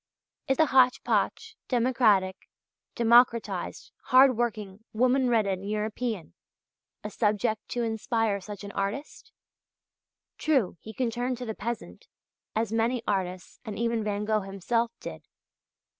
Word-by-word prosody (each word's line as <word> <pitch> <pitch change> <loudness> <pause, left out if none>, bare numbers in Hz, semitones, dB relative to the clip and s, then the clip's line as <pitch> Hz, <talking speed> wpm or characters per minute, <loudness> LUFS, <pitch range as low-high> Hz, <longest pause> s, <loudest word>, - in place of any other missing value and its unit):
Is 270 - +1
the 315 - +5
hotch 260 -3 +4
potch, - - -1
democratic, 230 -7 +2 0.5
democratized, 235 0 +2
hard 260 -1 +6
working, 215 -3 -3
woman 255 +3 +3
ridden 200 -5 +1
European 215 -1 -3 0.7
a - - -5
subject 215 0 0
to 240 - -2
inspire 220 -2 -1
such 205 0 -8
an 200 - -7
artist? 200 +9 -4 1.1
True, 270 - +1
he 220 - -9
can 235 +1 -1
turn 245 +2 -2
to 250 +1 -7
the 220 - -3
peasant, 230 +1 -6 0.5
as 220 0 -1
many 230 +1 +1
artists, 185 -3 -3
and 215 -4 -6
even 230 -1 0
Van 210 0 -2
Gogh 215 0 +1
himself, 200 +5 -1
did. - - -8
225 Hz, 130 wpm, -27 LUFS, 205-245 Hz, 1.1 s, hard